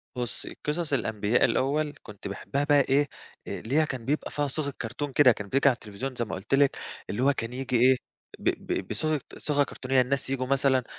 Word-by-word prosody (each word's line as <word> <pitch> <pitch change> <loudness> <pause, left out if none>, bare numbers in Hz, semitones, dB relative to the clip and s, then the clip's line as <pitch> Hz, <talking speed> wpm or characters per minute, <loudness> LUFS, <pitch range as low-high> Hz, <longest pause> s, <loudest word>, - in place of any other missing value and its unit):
بُصّي، 120 -4 -4
قِصَص 150 0 -1
الأنبياء 110 -3 +2
الأول 145 +3 +1
كنت 105 -2 -9
باحبّها 135 +8 -2
بقى 145 -1 +5
إيه، 140 +2 +2 0.4
آآ - - -4
اللي 120 +6 -3
هي 155 - +4
كان 130 -5 -5
بيبقى 150 +3 -1
فيها 145 -1 0
صيغة 140 0 -2
cartoon 130 +5 -4
كده 130 -1 +6
كان 105 -3 -4
بييجي 140 +3 +4
على - - +3
التليفزيون 115 +4 -6
زي 120 - -1
ما - - -4
قُلت 95 +8 -5
لِك، 140 -1 +3 0.3
اللي 115 +5 -1
هو 140 +1 +5
كان 115 -2 -4
ييجي 130 0 -2
إيه، 130 +1 +7 0.4
ب - - +2
ب - - -3
بصيغة 155 -2 0 0.2
صيغة 145 -1 +2
كرتونية 130 -1 +1
الناس 135 +1 -1
ييجوا 130 -1 -1
مثلًا 135 -1 +3
135 Hz, 210 wpm, -27 LUFS, 120-145 Hz, 0.4 s, إيه